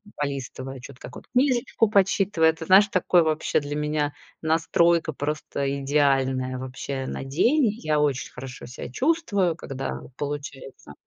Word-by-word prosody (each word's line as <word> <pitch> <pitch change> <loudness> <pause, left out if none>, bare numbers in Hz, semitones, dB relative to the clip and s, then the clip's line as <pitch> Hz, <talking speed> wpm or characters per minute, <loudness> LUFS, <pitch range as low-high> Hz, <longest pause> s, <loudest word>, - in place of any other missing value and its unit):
полистывая 135 -2 -5
чё-то, 125 0 -12
какую-то 125 - -10
книжечку 245 -4 +2
почитывая. 195 -5 +3
Ты 160 0 -8
знаешь, 195 +4 +7
такое 180 -2 +3
вообще 155 0 +1
для 145 0 -5
меня 150 -1 -1 0.3
настройка 165 +1 +2
просто 140 -1 -3
идеальная, 135 -2 +1
вообще, 130 +1 -5
на 135 - -5
день. 235 - +3 0.2
Я 155 -1 +1
очень 145 -3 0
хорошо 125 0 -9
себя 125 0 -8
чувствую, 205 - +1
когда 135 -4 -5 0.2
получается. 140 - -6
150 Hz, 130 wpm, -25 LUFS, 135-170 Hz, 0.3 s, знаешь